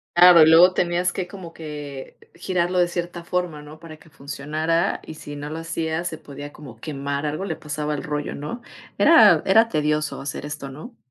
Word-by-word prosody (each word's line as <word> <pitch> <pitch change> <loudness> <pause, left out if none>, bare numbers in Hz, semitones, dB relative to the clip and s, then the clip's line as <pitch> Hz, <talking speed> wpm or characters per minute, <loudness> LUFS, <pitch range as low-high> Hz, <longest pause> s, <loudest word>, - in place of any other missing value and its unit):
Claro 175 -1 +8
y 155 - +7
luego 175 +3 +7
tenías 175 0 0
que 185 -2 -3
como 180 -3 -10
que 145 -4 -8 0.2
girarlo 180 0 -1
de 175 - +4
cierta 175 0 -5
forma, 175 -4 -3
¿no? 150 +1 -13
Para 160 -2 -11
que 160 - -20
funcionara, 155 +5 -2
y 160 - -8
si 145 -1 -9
no 145 +1 -6
lo 160 - -5
hacías 165 0 -3
se 160 - -5
podía 145 0 -10
como 135 -8 -12
quemar 140 +1 -4
algo, 155 +6 -3
le 160 -5 -3
pasaba 150 0 -4
al 145 - -4
rollo, 150 -1 -3
¿no? 190 +12 -6 0.4
Era - - +6
era 225 +1 +5
tedioso 150 -1 -1
hacer 140 +1 -6
esto, 145 -2 -6
¿no? 160 - -11
155 Hz, 195 wpm, -23 LUFS, 145-175 Hz, 0.4 s, Claro